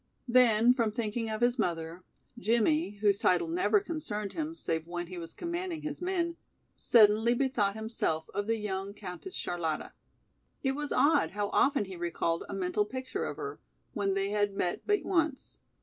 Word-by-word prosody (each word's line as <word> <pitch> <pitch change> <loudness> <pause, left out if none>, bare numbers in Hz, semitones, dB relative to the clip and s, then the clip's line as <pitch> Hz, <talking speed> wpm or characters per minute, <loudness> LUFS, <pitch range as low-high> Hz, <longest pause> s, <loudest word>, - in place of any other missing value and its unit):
Then 240 -1 +5
from 230 -4 +1
thinking 225 0 -2
of 215 +1 -3
his 240 +1 +2
mother, 170 -2 -2 0.4
Jimmie, 235 +1 +2
whose 200 -2 +3
title 180 - +3
never 360 +5 +3
concerned 275 - -4
him 320 0 -3
save 160 - -2
when 175 0 -4
he 180 0 -7
was 165 -1 -8
commanding 345 -1 -4
his 305 +1 -5
men, 345 -2 -1 0.4
suddenly 220 +1 +5
bethought 240 -6 +1
himself 220 -8 -2
of 205 0 -2
the 225 0 +1
young 200 -1 -4
Countess 200 - -8
Charlotta. 165 -3 -3 0.7
It 265 - +2
was 295 +1 -3
odd 285 - +4
how 205 -1 0
often 275 -3 +3
he 190 -1 -8
recalled 170 -1 -1
a - - -4
mental 185 +2 +1
picture 260 +4 -4
of - - -5
her, 425 0 -5 0.3
when 195 -2 0
they 195 +1 0
had 205 -1 +1
met 175 -2 -2
but 415 -1 +2
once. 320 -7 0
220 Hz, 170 wpm, -30 LUFS, 195-285 Hz, 0.7 s, Then